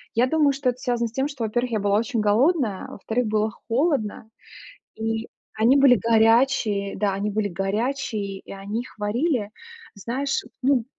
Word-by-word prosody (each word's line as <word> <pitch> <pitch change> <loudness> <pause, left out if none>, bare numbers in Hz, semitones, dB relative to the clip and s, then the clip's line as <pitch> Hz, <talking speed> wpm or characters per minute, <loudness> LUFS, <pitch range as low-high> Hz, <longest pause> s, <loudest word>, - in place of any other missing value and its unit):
я 240 +3 +3
думаю, 300 0 +3
что 275 -1 0
это 250 0 -4
связано 240 -3 -1
с - - -11
тем, 265 +3 0
что, 275 -5 -5
во-первых, 240 +3 -1
я 220 - 0
была 200 0 +2
очень 230 +1 -2
голодная, 220 - +2
а - - -10
во-вторых, 225 +4 -2
было 215 0 0 0.2
холодно, 230 -5 0 0.7
и 225 0 -3 0.3
они 225 +5 +4
были 270 -3 +7
горячие, 225 -2 +2
да, 200 -1 +1
они 200 +2 -2
были 210 0 -1
горячие 205 +1 -2
и - - -13
они 200 +3 -4
их 250 - -13
варили, 220 +1 -1 0.4
знаешь, 260 +7 -2 0.2
ну 260 -3 +3
225 Hz, 170 wpm, -24 LUFS, 210-260 Hz, 0.7 s, были